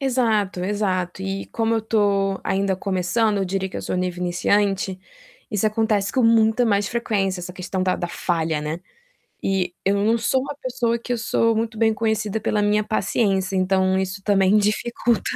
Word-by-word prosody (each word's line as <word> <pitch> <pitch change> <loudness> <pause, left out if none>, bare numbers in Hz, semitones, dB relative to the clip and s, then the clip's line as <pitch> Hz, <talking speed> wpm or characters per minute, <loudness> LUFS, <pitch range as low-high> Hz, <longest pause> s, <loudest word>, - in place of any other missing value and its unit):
Exato, 225 -8 +1
exato 190 -3 -1
e 195 0 -3
como 225 0 +1
eu 225 - +1
tô 200 -3 +1
ainda 195 0 0
começando, 195 +3 0
eu 195 - 0
diria 190 +1 -2
que - - -8
eu - - -5
sou - - -2
nível 180 -1 -2
iniciante, 190 +2 +1 0.5
isso 210 0 +1
acontece 215 -2 +1
com 260 - +2
muita 225 +1 +4
mais 205 -2 +1
frequência, 200 -6 -1
essa 180 +1 -7
questão 185 +1 -3
da 185 0 +1
da 175 - -3
falha, 165 -3 -1
né, 155 +3 -4 0.6
e, 185 -2 0
eu 195 +1 +2
não 225 +2 +3
sou 235 +3 +1
uma 275 +2 -5
pessoa 245 -4 -1
que 240 +1 -5
eu 240 - -1
sou 230 0 +1
muito 225 0 -2
bem 220 0 +3
conhecida 220 -1 -1
pela 210 0 0
minha 210 +1 +2
paciência, 200 -3 0
então, 190 0 +2
isso 190 +1 -3
também 195 0 +3
dificulta. 220 +1 +1
200 Hz, 180 wpm, -22 LUFS, 190-225 Hz, 0.6 s, muita